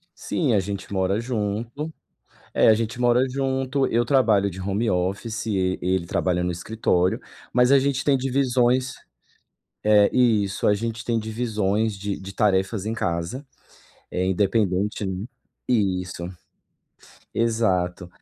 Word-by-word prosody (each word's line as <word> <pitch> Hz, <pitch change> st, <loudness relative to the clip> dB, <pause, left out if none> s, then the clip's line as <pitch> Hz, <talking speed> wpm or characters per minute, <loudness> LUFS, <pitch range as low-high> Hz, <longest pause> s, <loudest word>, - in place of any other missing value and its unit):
Sim, 140 Hz, -9 st, -1 dB
a 105 Hz, -, +4 dB
gente 100 Hz, +1 st, -5 dB
mora 95 Hz, +2 st, +1 dB
junto. 115 Hz, +5 st, -3 dB, 0.6 s
É, -, -, +5 dB
a 110 Hz, -, +8 dB
gente 115 Hz, +2 st, -3 dB
mora 120 Hz, 0 st, +4 dB
junto, 135 Hz, 0 st, 0 dB
eu 120 Hz, +1 st, +1 dB
trabalho 110 Hz, -7 st, +3 dB
de 95 Hz, +1 st, -9 dB
home 100 Hz, +4 st, -1 dB
office 100 Hz, +5 st, -2 dB
e 95 Hz, -3 st, 0 dB
e 90 Hz, -, -1 dB
ele 90 Hz, -2 st, -1 dB
trabalha 90 Hz, +1 st, 0 dB
no 90 Hz, -, 0 dB
escritório, 90 Hz, 0 st, 0 dB, 0.3 s
mas 125 Hz, +1 st, +4 dB
a 140 Hz, -, +7 dB
gente 135 Hz, -1 st, 0 dB
tem 140 Hz, -2 st, +4 dB
divisões 130 Hz, -1 st, +1 dB, 0.9 s
eh, 105 Hz, -1 st, +5 dB
isso. 110 Hz, -6 st, +2 dB
A 105 Hz, -, +5 dB
gente 115 Hz, +2 st, -3 dB
tem 115 Hz, -2 st, 0 dB
divisões 110 Hz, -2 st, -1 dB
de 100 Hz, 0 st, -4 dB
de 95 Hz, 0 st, -9 dB
tarefas 100 Hz, 0 st, +1 dB
em 110 Hz, -, -1 dB
casa, 90 Hz, -, -3 dB, 0.6 s
eh, 90 Hz, +1 st, -1 dB
independente, 100 Hz, +1 st, +1 dB
né. 95 Hz, +2 st, -3 dB, 0.4 s
Isso. 90 Hz, -7 st, 0 dB, 1.1 s
Exato. 95 Hz, -7 st, 0 dB
105 Hz, 140 wpm, -24 LUFS, 95-120 Hz, 1.1 s, a